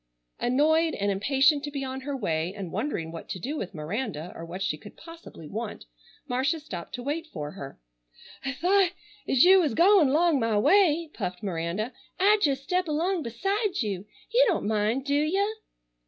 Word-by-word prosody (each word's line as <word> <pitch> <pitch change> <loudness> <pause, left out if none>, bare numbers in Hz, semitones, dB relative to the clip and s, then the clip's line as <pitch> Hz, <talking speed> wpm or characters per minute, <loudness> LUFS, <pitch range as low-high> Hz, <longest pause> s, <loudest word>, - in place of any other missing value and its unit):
Annoyed, 315 +6 +2
and 200 0 0
impatient 270 +8 +3
to 295 - -3
be 280 -1 -4
on 265 0 -5
her 280 +1 -4
way, 170 -4 -2
and 190 -5 -6
wondering 165 - -3
what 165 - -9
to 185 - -4
do 275 - -4
with 200 - -5
Miranda, 175 - -4
or 165 - -8
what 180 +3 -5
she 190 - 0
could 150 - -13
possibly 330 - -12
want, 220 +5 -6 0.4
Marcia 265 +6 0
stopped 185 - -7
to 245 - -7
wait 310 +5 -3
for 150 - -6
her. 140 -8 -9 0.6
"I 270 - -1
thought—as 360 -5 +1
you 380 +2 +8
was 290 -9 0
goin' 360 -4 +6
'long 320 -1 +3
my 225 -3 +1
way"—puffed 300 - +2
Miranda, 185 +5 -2 0.3
"I'd 410 +2 +4
jes' 275 -2 +1
step 360 +3 0
along 335 +4 0
beside 390 - -1
you. 200 -2 -4 0.3
You - - +6
don't 360 - 0
mind, 215 +5 0
do 280 - 0
you?" 385 +9 +1
270 Hz, 175 wpm, -27 LUFS, 200-330 Hz, 0.6 s, you